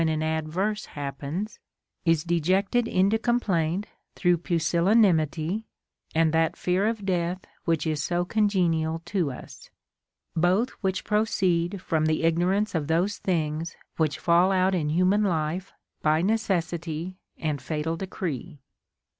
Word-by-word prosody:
329 155 -1 +1
an - - +1
adverse 205 +6 -1
happens, 145 +8 -4 0.5
is 165 -2 +3
dejected 190 +8 +1
into 200 +3 +2
complaint 200 -6 0 0.3
through 175 -1 +3
pusillanimity 170 +1 +2 0.5
and 160 -1 +3
that 160 0 +2
fear 185 +3 +1
of 220 -3 -2
death 180 -1 0 0.2
which 165 -1 +1
is 155 -2 0
so 175 +2 0
congenial 170 -6 +1
to 175 -6 0
us; 125 - -11 0.7
both 185 +9 +2
which 190 -2 -1
proceed 190 -4 +1
from 155 -1 +1
the 155 +1 0
ignorance 180 +6 +2
of 155 -4 -1
those 175 +6 +1
things 165 -2 -1 0.2
which 155 -3 +1
fall 175 +2 +4
out 190 0 +3
in 155 -5 0
human 185 +6 +3
life 175 +1 -1 0.3
by 155 0 +3
necessity 180 -4 -1 0.2
and 150 -4 -2
fatal 155 +3 -2
decree. 170 -4 -5
175 Hz, 130 wpm, -26 LUFS, 160-195 Hz, 0.7 s, fall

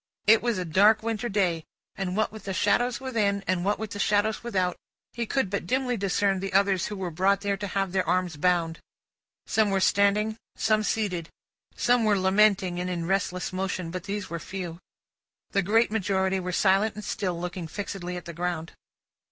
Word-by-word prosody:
It 220 +1 +6
was 235 -3 0
a 180 - -2
dark 205 +7 +4
winter 230 +1 -2
day, 180 -5 +1 0.3
and 190 0 -3
what 215 - +1
with 220 0 -11
the 195 -1 -3
shadows 245 +5 +2
within, 210 -7 0
and 185 -2 0
what 205 +2 +1
with 220 -1 -5
the 205 - -5
shadows 210 +2 +1
without, 185 -6 0 0.4
he 235 -1 -3
could 270 -2 +1
but 200 -4 -2
dimly 255 +2 0
discern 195 -1 +1
the 195 0 -4
others 195 -2 +3
who 210 - -5
were 185 -3 -4
brought 195 +4 +2
there 200 -1 0
to 205 0 -4
have 195 -1 -1
their 185 -2 0
arms 180 -2 +1
bound. 165 0 +1 0.7
Some 220 -2 +2
were 195 -1 +1
standing; 205 +3 +2 0.2
some 215 -1 +2
seated. 195 -6 -1 0.5
Some 245 -1 +3
were 210 -2 +3
lamenting, 190 -1 +3
and 180 0 -2
in 170 -2 -2
restless 180 -1 -1
motion; 185 -2 -3
but, 185 +1 -5
these 205 0 -3
were 170 - -5
few. 175 -2 -6 0.7
The 200 - +2
great 220 +5 +3
majority 190 -2 0
were 180 0 -3
silent 195 +3 +2
and 210 - -7
still, 180 -4 -2
looking 175 -1 -5
fixedly 180 0 -5
at 175 - -8
the 170 - -7
ground. 170 -1 -3
195 Hz, 195 wpm, -27 LUFS, 180-210 Hz, 0.7 s, It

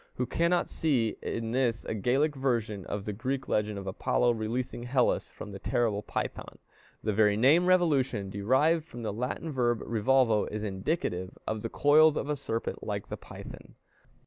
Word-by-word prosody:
Who 125 - -1
cannot 170 +6 +1
see 125 -9 0
in 115 -1 -3
this 120 -3 0
a - - -2
Gallic 135 +8 +1
version 115 -7 -1
of 100 0 -4
the 105 - -3
Greek 130 +5 -3
legend 105 -1 0
of 100 - -6
Apollo 110 +5 +1
releasing 120 +2 -3
Hellas 125 +1 +1
from 105 - -9
the 100 - -8
terrible 115 -4 0
Python? - - -5 0.5
The 110 - 0
very 105 0 +3
name 150 +10 +5
revolution, 135 - +2
derived 130 +11 +2
from 120 -7 -9
the 110 - -2
Latin 125 +8 -3
verb 120 -4 +1
revolvo, 115 -1 +2
is 105 0 -4
indicative 95 - -2
of 110 -1 -2
the 115 - -3
coils 150 +5 +5
of 145 - -3
a 150 - +1
serpent 115 -5 -4
like - - -4
the - - -4
Python. - - -11
120 Hz, 170 wpm, -29 LUFS, 105-135 Hz, 0.5 s, name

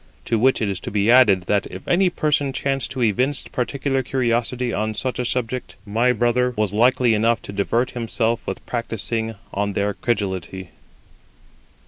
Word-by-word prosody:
To 115 - +1
which 130 0 +3
it - - +1
is 100 -2 -2
to - - -6
be 105 +2 +2
added 105 -8 +6
that 100 +1 0
if 95 - -10
any 180 +1 +3
person 145 -4 0
chanced 135 -1 -1
to 130 -2 -2
evince 125 +6 +1
particular 135 +1 -1
curiosity 125 -1 -1
on 110 +1 -1
such 130 +3 -3
a 125 - -1
subject, 125 +1 -2
my 115 +4 +2
brother 125 +1 +1
was 105 -2 0
likely 120 +1 +3
enough 115 +1 +2
to 100 - -7
divert 115 +5 0
himself 115 0 -1
with - - -5
practising 115 -1 -3 0.2
on 100 0 -1
their 100 +1 0
credulity. 95 -5 -3
115 Hz, 165 wpm, -22 LUFS, 105-125 Hz, 0.2 s, added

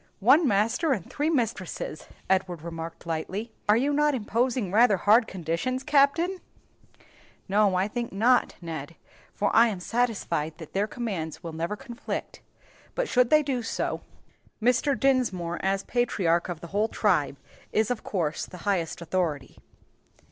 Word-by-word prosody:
"One 275 - +5
master 230 +8 +2
and 195 -9 -4
three 300 +2 -1
mistresses!" 225 - -2 0.2
Edward 185 -4 0
remarked 165 0 -7
lightly; 185 +7 -4 0.2
"are 210 - +6
you 280 +4 +1
not 295 0 +3
imposing 235 -2 0
rather 215 -1 +5
hard 220 +5 +4
conditions, 185 - -2
Captain?" 300 +6 +3 1.1
"No, 200 -1 +3
I 185 +2 +2
think 235 +2 -4
not, 240 +6 +3
Ned, 160 -1 -6 0.4
for 205 - -1
I 230 +1 +7
am 205 -5 -3
satisfied 200 -8 -1
that 160 -3 -11
their 200 +2 +1
commands 190 -9 -4
will 165 -1 -6
never 170 +6 -2
conflict; 240 0 -6 0.5
but - - 0
should 250 - +3
they 305 0 +5
do 265 -4 -1
so, 225 - -2 0.6
Mr. 250 +3 +2
Dinsmore, 215 -10 +1
as 195 0 +1
patriarch 190 -9 +1
of 170 -2 -5
the 170 - -7
whole 210 +2 +2
tribe, - - +1 0.3
is 220 +2 +1
of 245 - -3
course 160 -6 -2
the 180 - -10
highest 175 -5 -1
authority." 160 -6 -2
210 Hz, 150 wpm, -27 LUFS, 175-250 Hz, 1.1 s, I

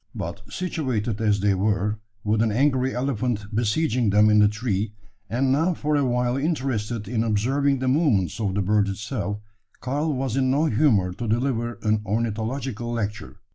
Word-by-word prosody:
But 85 +5 -5
situated 125 - -2
as 105 -2 +2
they 100 0 +3
were, 105 +2 0 0.2
with 105 +1 +1
an 110 -1 +2
angry 130 +2 +1
elephant 125 -4 -1
besieging 120 +1 +1
them 105 +2 +5
in 105 - +5
the 105 - +6
tree, 105 -1 -2 0.4
and 130 +3 +1
now 165 +6 +2
for 150 0 0
a 145 - +2
while 125 0 +1
interested 125 - -2
in 115 0 0
observing 135 +6 +1
the 130 0 -2
movements 130 - +2
of 100 -4 -1
the 100 - +1
bird 105 +1 +2
itself, 105 0 -3 0.4
Karl 145 +5 -1
was 130 -3 -2
in 130 -1 +2
no 145 +4 +2
humour 110 - +2
to 115 +5 -5
deliver 120 0 -1
an 110 -1 +2
ornithological 115 +3 -2
lecture. 105 -3 -4
115 Hz, 170 wpm, -24 LUFS, 105-130 Hz, 0.4 s, the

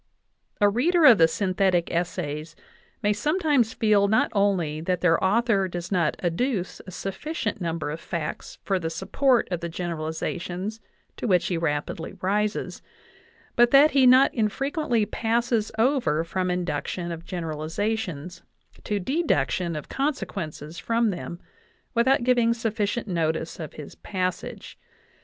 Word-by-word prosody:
A 205 - +5
reader 310 - +3
of 240 -8 +8
the 165 - +7
synthetic 185 -1 +1
essays 160 -3 -3 0.5
may 210 0 +3
sometimes 295 - +1
feel 210 -2 +3
not 220 +2 +2
only 185 -7 +1
that 180 +1 -1
their 165 -2 +3
author 205 0 +2
does 175 0 -6
not 170 -5 +1
adduce 185 +3 -1
a - - -6
sufficient 210 - -4
number 165 -3 -2
of 160 - -5
facts 165 -4 -5
for 195 -2 0
the 165 -2 -3
support 225 +9 +1
of 175 - -1
the 170 0 -4
generalizations 175 +4 -4 0.4
to - - -3
which 180 -4 +3
he 180 - -1
rapidly 160 0 -2
rises, 210 +3 -1 0.7
but 240 0 +5
that 280 +4 +7
he 265 -2 +5
not 255 +2 +6
infrequently 240 +1 0
passes 230 0 0
over 225 - +2
from 185 +2 -2
induction 175 0 -2
of 165 0 -6
generalizations 170 +1 -3 0.4
to 205 -1 -1
deduction 180 - 0
of 150 - -6
consequences 170 - -4
from 230 -1 +1
them 175 -1 -6 0.5
Without 245 +1 +3
giving 240 -2 +3
sufficient 225 0 -2
notice 165 -2 -1
of 155 -3 -6
his 150 - -9
passage. 185 -2 -4
190 Hz, 135 wpm, -25 LUFS, 170-230 Hz, 0.7 s, of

